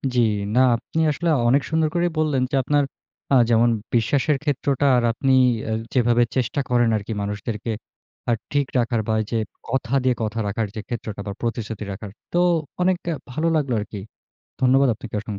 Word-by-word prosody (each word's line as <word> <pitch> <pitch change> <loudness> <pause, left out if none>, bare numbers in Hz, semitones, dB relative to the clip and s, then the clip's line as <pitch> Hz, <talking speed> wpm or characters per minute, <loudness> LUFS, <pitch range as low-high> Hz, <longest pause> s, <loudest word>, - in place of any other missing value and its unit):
জি, - - +3 0.4
না - - +5 0.2
আপনি 160 +7 -4
আসলে 170 +4 -1 0.2
অনেক 140 +3 +4
সুন্দর 160 -1 +2
করেই 175 0 +1
বললেন 150 -4 +1
যে, - - 0
আপনার 145 +2 +2 0.5
আ - - +7
যেমন 115 +1 +4 0.3
বিশ্বাসের 135 +5 +2
ক্ষেত্রটা 140 -1 0
আর 120 - +2
আপনি 135 +3 +1 0.6
যেভাবে 120 -1 +4
চেষ্টা 130 +2 0
করেন 120 -2 +3
আরকি 105 +2 -5
মানুষদেরকে 105 +2 -3 0.6
আ - - +4 0.2
ঠিক 140 -2 +1
রাখার 120 -2 +1
বা 110 - +1 0.2
যে 115 - +1 0.3
কথা 130 0 -1
দিয়ে 130 -2 +2
কথা 110 +1 -2
রাখার 110 +1 -1
যে 110 - -4
ক্ষেত্রটা 110 -4 -5
বা 100 - -3
প্রতিশ্রুতি 115 -2 -3
রাখার। 95 +1 -7 0.2
তো - - +1 0.4
অনেকটা 180 -2 +1 0.2
ভালো 155 +6 0
লাগলো 140 -5 0
আরকি। 105 -1 -6 0.6
ধন্যবাদ 130 +1 +4
আপনাকে 110 0 -10
অসংখ্য। 105 -2 -6
120 Hz, 170 wpm, -23 LUFS, 110-140 Hz, 0.6 s, আ